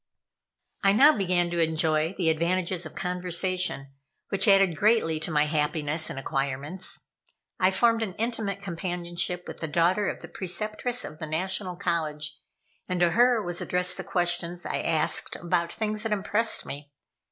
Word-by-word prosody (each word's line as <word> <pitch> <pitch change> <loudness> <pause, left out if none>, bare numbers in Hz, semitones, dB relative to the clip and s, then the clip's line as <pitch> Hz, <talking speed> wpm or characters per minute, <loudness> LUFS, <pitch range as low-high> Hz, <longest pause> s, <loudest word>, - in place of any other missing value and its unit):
I 195 0 +4
now 285 +8 +7
began 180 -3 +1
to 170 - -1
enjoy 160 +1 +1
the 165 -4 +3
advantages 175 +1 -1
of - - -15
conversation, 180 -4 -1 0.4
which 195 -1 +2
added 195 -4 +5
greatly 200 -5 +2
to 155 - -3
my 150 -1 +3
happiness 150 +1 -1
and - - -6
acquirements. 140 +6 -3 0.5
I 185 - +5
formed 230 +4 +2
an 195 -5 -3
intimate 215 -4 -2
companionship 175 -1 -3
with - - -8
the 160 - -3
daughter 175 +6 +2
of - - -6
the - - -7
Preceptress 215 +6 -2
of 155 - -9
the 155 - -5
National 180 +3 -1
College, 150 -4 -2 0.5
and 180 -1 -1
to 175 -1 +4
her 240 0 +4
was 175 -1 -3
addressed 180 0 +1
the - - -5
questions 175 -1 0
I - - -2
asked 160 -2 +1
about 170 0 -1
things 215 -1 -2
that 225 -1 -2
impressed 210 +2 +1
me. 145 +1 -8
175 Hz, 160 wpm, -27 LUFS, 160-195 Hz, 0.5 s, now